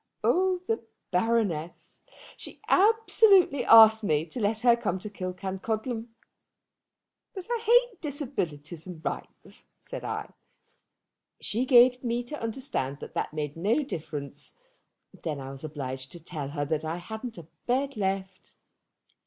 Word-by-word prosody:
Oh, 370 0 +2
the 225 - -1 0.3
Baroness! 180 -5 -1 0.3
She - - -11
absolutely 400 - +4
asked 220 -1 +8
me 155 -5 +1
to 170 +9 -7
let 215 0 0
her 240 -1 +6
come 190 -6 -2
to 205 +3 -8
Killancodlem. 205 +5 -4 1.3
'But 380 -2 -7
I 475 - +1
hate 485 0 +3
disabilities 175 - -4
and 170 -3 -9
rights,' - - -6
said - - -8
I. - - -4 1.1
She 235 +5 -1
gave 250 0 +6
me 240 0 -1
to 295 +5 -7
understand 225 - -3
that - - -9
that - - -2
made 150 -1 -4
no 215 - +1
difference. 145 - -7 0.7
Then 150 -3 -3
I 135 0 -7
was 135 +1 -9
obliged 130 -3 -5
to 175 - -8
tell 155 -5 -5
her 145 0 -2
that 155 +1 -1
I 160 +1 -2
hadn't 220 +5 -7
a 170 - -9 0.2
bed 270 +2 0
left. 190 -2 -3
210 Hz, 135 wpm, -28 LUFS, 160-255 Hz, 1.3 s, asked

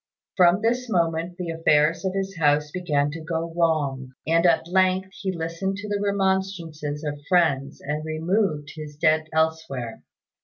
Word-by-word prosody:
From 180 +2 +4
this 245 +2 0
moment 170 -2 0
the 175 -3 -3
affairs 160 0 +2
of 190 0 -1
his 195 0 -2
house 150 -1 +2
began 150 -5 0
to 165 +2 -7
go 165 0 -3
wrong; 145 -6 0
and 165 +2 +3
at 165 -1 +2
length 185 +1 +2
he 195 -1 -4
listened 170 +3 -3
to 205 +1 -6
the 205 -1 -1
remonstrances 190 -7 -1
of 145 -1 -4
friends 145 -6 +2
and 150 +2 -3
removed 155 -1 -1
his 150 -2 -8
dead 155 0 +2
elsewhere. 160 -7 -1
165 Hz, 155 wpm, -24 LUFS, 150-190 Hz, -, From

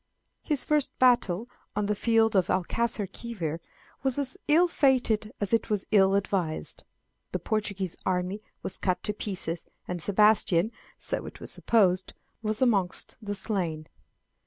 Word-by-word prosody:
His 295 -4 -1
first 300 -2 +1
battle 235 -5 +3 0.3
on 210 0 0
the 210 - +1
field 225 0 +2
of 185 -2 +4
Alcaçarquivir 195 -3 -2 0.4
was 265 -1 0
as 275 -2 +2
ill 330 +4 +5
fated 250 -9 +2
as 205 +1 -2
it 230 0 +2
was 210 -3 0
ill 195 -2 +5
advised; 185 -5 -2 0.5
the - - +1
Portuguese 200 -5 -2
army 185 +2 -1 0.2
was - - -2
cut 185 -2 0
to 210 - 0
pieces, 180 -5 -4 0.2
and 180 -1 -3
Sebastian, 205 0 +3 0.3
so - - -1
it - - -10
was - - -5
supposed, 185 -5 +2 0.3
was 215 +2 +1
amongst 200 -7 +1
the 205 -1 -4
slain. 180 -6 -2
205 Hz, 140 wpm, -28 LUFS, 185-230 Hz, 0.5 s, ill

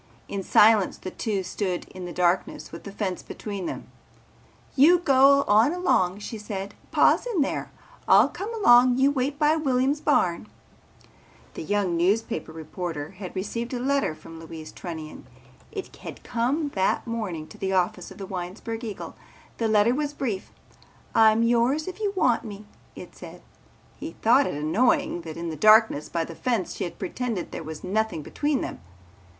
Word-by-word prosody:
In 200 - -4
silence 210 0 +4
the 185 - -7
two 205 -4 -2
stood 185 0 -3
in 185 -1 -8
the 175 - -6
darkness 180 +1 0
with - - -10
the 200 - -7
fence 195 -2 -3
between 200 -4 -6
them. - - -7 0.8
"You 315 +7 +7
go 280 -3 +5
on 220 +9 +4
along," 205 - +1
she 220 +1 -6
said. 200 -1 -6 0.2
"Pa's - - +3
in 420 -10 0
there. 280 - -2 0.4
I'll - - +7
come 415 +4 -6
along. 245 - +6
You 270 +2 +4
wait 275 +1 -1
by 300 +1 +3
Williams' 275 -1 +1
barn." 175 - +1 1.1
The - - -7
young 195 0 0
newspaper 205 +7 0
reporter 160 -1 -6
had 185 -1 -9
received 230 +6 -3
a - - -3
letter 275 - 0
from 165 +1 -12
Louise 160 -1 -9
Trunnion. 160 -6 -8 0.4
It 390 -3 -7
had - - -10
come 265 +6 -1
that 190 -8 0
morning 210 -9 -4
to - - -14
the 190 0 -1
office 180 -1 0
of - - -13
the 195 - -6
Winesburg 190 +6 -6
Eagle. 215 -4 -6 0.4
The 230 - +1
letter 215 +2 +4
was 295 +1 -2
brief. 215 -8 -3 0.6
"I'm 220 0 +5
yours 240 +7 +2
if 370 - -6
you 415 -2 0
want 245 -10 +2
me," 210 -1 -9 0.3
it - - -11
said. - - -11 0.6
He 320 - -6
thought 255 +5 +5
it - - -3
annoying 175 +4 +1
that 160 -1 -8
in 170 0 -4
the - - -5
darkness 215 -3 +5
by 165 -1 -1
the 165 - -9
fence 225 0 -1
she - - -3
had 175 - -8
pretended 215 0 -4
there - - -5
was 160 -1 -8
nothing 205 -4 -1
between 290 - -1
them. - - -5
215 Hz, 170 wpm, -25 LUFS, 180-260 Hz, 1.1 s, You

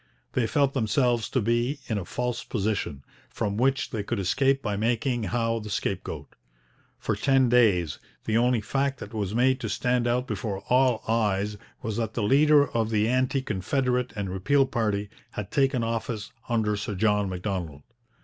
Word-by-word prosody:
They 120 -3 +1
felt 140 +2 +2
themselves 120 -1 +1
to 130 - +1
be 120 +6 +1
in 110 -3 -1
a 90 - -6
false 125 +5 -3
position, 100 - -2 0.3
from 100 -1 -2
which 135 +4 +1
they 110 - -2
could 115 +3 -3
escape 135 +8 +1
by 105 - -1
making 115 +2 0
Howe 115 +3 0
the 105 -1 -8
scapegoat. - - -3 0.6
For - - -1
ten 135 -3 +3
days 100 - +3 0.3
the 110 - 0
only 120 0 +3
fact 135 +5 -1
that 105 - -9
was 105 -1 -2
made 130 +2 +3
to - - -4
stand 125 -1 +1
out 125 +1 +1
before 100 -6 -4
all 125 -2 +3
eyes 105 -2 +1 0.3
was 110 -1 -3
that 110 -2 -2
the 115 - 0
leader 145 +5 +5
of 115 -1 0
the 110 -1 +2
anti 130 +2 +1
confederate 125 +4 0
and 100 -3 -3
repeal 135 +10 +2
party 105 -5 -1 0.2
had 105 -3 -5
taken 135 -3 +2
office 115 -2 -3 0.2
under 110 -3 +1
Sir 105 0 -4
John 105 0 +2
Macdonald. 90 -6 -4
115 Hz, 170 wpm, -26 LUFS, 105-125 Hz, 0.6 s, leader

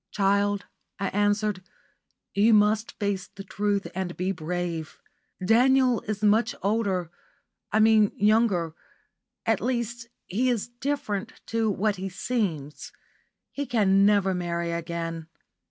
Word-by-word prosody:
"Child," 200 0 +1 0.3
I 195 -1 -1
answered, 205 -1 +1 0.7
"you 215 +3 +5
must 210 +1 +2
face 200 -3 -2
the 195 - -10
truth 205 0 -1
and 185 -2 -4
be 185 +2 0
brave. 170 -2 -4 0.5
Daniel 250 +3 +4
is 215 0 -3
much 220 +3 +3
older 195 -5 0 0.6
I 215 - +3
mean 215 -1 +5
younger 205 -6 +2 0.7
at 225 -3 +1
least, 235 0 -2 0.2
he 245 +8 0
is 235 -4 -1
different 240 -4 -3 0.2
to 225 -1 +2
what 205 +1 0
he 190 +1 -4
seems. 185 - -3 0.6
He 285 -1 -4
can 200 -5 +3
never 200 -2 +3
marry 170 -1 -2
again. 165 -1 -4
205 Hz, 120 wpm, -26 LUFS, 185-225 Hz, 0.7 s, you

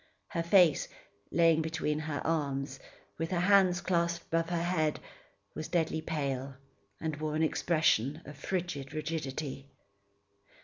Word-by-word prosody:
Her 170 - -1
face, 170 -2 +5 0.4
lying 165 -1 +4
between 160 -1 -1
her 155 -2 -4
arms, 140 -4 -1 0.4
with 165 0 -1
her 180 - 0
hands 185 -2 +5
clasped 170 -1 0
above 165 0 +1
her 170 -1 0
head, 160 -4 +1 0.5
was 155 - -5
deadly 160 -2 0
pale, 140 -4 -3 0.4
and 155 -2 -3
wore 155 0 -2
an 160 - +2
expression 155 -3 +2
of 145 - -9
frigid 160 -3 -3
rigidity. 150 -3 -4
160 Hz, 130 wpm, -31 LUFS, 145-170 Hz, 0.5 s, face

